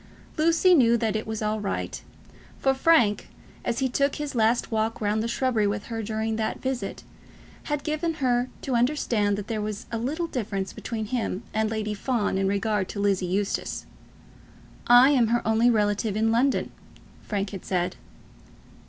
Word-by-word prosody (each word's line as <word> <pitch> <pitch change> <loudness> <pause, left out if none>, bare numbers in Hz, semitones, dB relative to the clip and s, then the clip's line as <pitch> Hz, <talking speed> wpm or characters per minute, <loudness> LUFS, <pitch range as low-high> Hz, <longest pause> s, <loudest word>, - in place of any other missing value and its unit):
Lucy 335 +3 +4
knew 235 -7 +5
that 220 -2 -1
it 215 - -2
was 220 0 -3
all 215 +1 0
right; 205 - -3 0.6
for 270 - +2
Frank, 265 -7 +3 0.3
as 235 - -1
he 265 - +1
took 280 +2 +1
his 295 -1 -4
last 230 0 +1
walk 220 0 0
round 210 0 0
the 225 - -1
shrubbery 235 -3 +1
with 200 0 -2
her 225 - -2
during 220 +1 -2
that 220 -1 -2
visit, 260 -1 -4 0.6
had 295 -1 -2
given 315 +2 -1
her 250 -3 +1
to 265 - -2
understand 235 -5 +1
that 205 - -5
there 215 -1 -3
was 210 +1 -4
a 230 - -2
little 300 +9 -2
difference 200 - -3
between 220 -2 -4
him 225 -2 -2
and 220 0 +1
Lady 215 -1 -2
Fawn 210 -2 -1
in 195 - +1
regard 200 0 0
to 200 - -5
Lizzie 195 -2 +1
Eustace. 195 +2 -2 1.0
"I 245 +3 +8
am 250 -5 +4
her 235 0 0
only 225 +2 +4
relative 210 -1 +1
in 225 +1 +2
London," 255 +4 +1 0.5
Frank 200 -2 -3
had 195 -3 -7
said. 180 -1 -1
225 Hz, 170 wpm, -26 LUFS, 210-255 Hz, 1.0 s, I